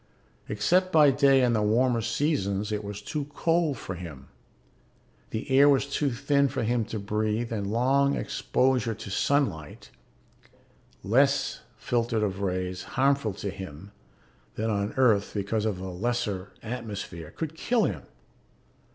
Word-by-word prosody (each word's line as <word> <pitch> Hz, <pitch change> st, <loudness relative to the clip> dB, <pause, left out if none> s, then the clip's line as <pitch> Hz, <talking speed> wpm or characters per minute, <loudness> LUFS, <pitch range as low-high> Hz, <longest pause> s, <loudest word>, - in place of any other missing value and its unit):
Except 180 Hz, -, +2 dB
by 150 Hz, -4 st, +6 dB
day 135 Hz, -1 st, +4 dB
in 120 Hz, -1 st, +3 dB
the 110 Hz, -, +1 dB
warmer 115 Hz, +3 st, +2 dB
seasons 110 Hz, -4 st, -1 dB
it 105 Hz, 0 st, -2 dB
was 100 Hz, 0 st, -7 dB
too 145 Hz, +6 st, -3 dB
cold 165 Hz, -4 st, +1 dB
for 95 Hz, -, -6 dB
him. 80 Hz, -7 st, -9 dB, 1.0 s
The 110 Hz, -, -4 dB
air 140 Hz, +2 st, +7 dB
was 135 Hz, -1 st, +3 dB
too 140 Hz, +1 st, -1 dB
thin 140 Hz, +3 st, +2 dB
for 130 Hz, -, -3 dB
him 115 Hz, 0 st, +1 dB
to 110 Hz, -, -5 dB
breathe 110 Hz, +3 st, -1 dB
and 100 Hz, -3 st, -2 dB
long 135 Hz, +4 st, +2 dB
exposure 125 Hz, -3 st, 0 dB
to 100 Hz, -, -8 dB
sunlight 95 Hz, -, -1 dB, 1.1 s
less 135 Hz, +7 st, +2 dB, 0.2 s
filtered 115 Hz, -2 st, 0 dB
of 100 Hz, -1 st, -2 dB
rays 90 Hz, -1 st, -2 dB, 0.2 s
harmful 135 Hz, -5 st, +2 dB
to 100 Hz, -1 st, -4 dB
him 95 Hz, 0 st, -9 dB, 0.6 s
than 110 Hz, +1 st, -1 dB
on 100 Hz, +2 st, -1 dB
Earth 120 Hz, -7 st, +2 dB
because 105 Hz, +2 st, -1 dB
of 105 Hz, -4 st, -1 dB
the 95 Hz, 0 st, -6 dB
lesser 100 Hz, -1 st, -2 dB
atmosphere 105 Hz, -8 st, -6 dB
could 160 Hz, -1 st, -5 dB
kill 230 Hz, +7 st, +1 dB
him. -, -, -1 dB
115 Hz, 145 wpm, -27 LUFS, 100-135 Hz, 1.1 s, air